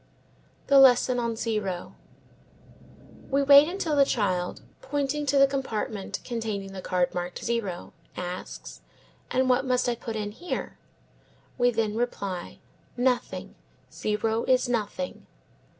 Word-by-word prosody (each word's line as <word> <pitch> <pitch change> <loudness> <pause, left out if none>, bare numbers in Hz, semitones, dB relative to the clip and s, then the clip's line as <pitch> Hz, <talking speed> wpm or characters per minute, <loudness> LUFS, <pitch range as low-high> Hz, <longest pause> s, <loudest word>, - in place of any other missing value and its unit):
The 280 -1 +6
Lesson 255 -1 +6
on 235 -1 -1
Zero. 210 -6 -3 1.4
We 280 +1 +2
wait 280 +1 +8
until 340 -4 -1
the 280 - +6
child, 185 -8 -1 0.2
pointing 285 +1 -2
to 280 +1 +3
the 275 - +8
compartment 220 -7 -3
containing 215 -5 -4
the 190 - -6
card 180 -1 0
marked 175 0 -4
zero, 225 -7 -3 0.2
asks, 180 0 -6 0.5
"And 260 0 +1
what 255 +1 +3
must 250 -2 +1
I 245 - +2
put 230 -1 -6
in 210 -1 -3
here?" 345 +12 -5 0.8
We 245 0 +5
then 220 -3 -1
reply, 200 -6 -3 0.4
"Nothing; 250 0 0 0.4
zero 220 +2 -1
is 255 0 +3
nothing." 245 +3 -3
235 Hz, 125 wpm, -27 LUFS, 205-270 Hz, 1.4 s, wait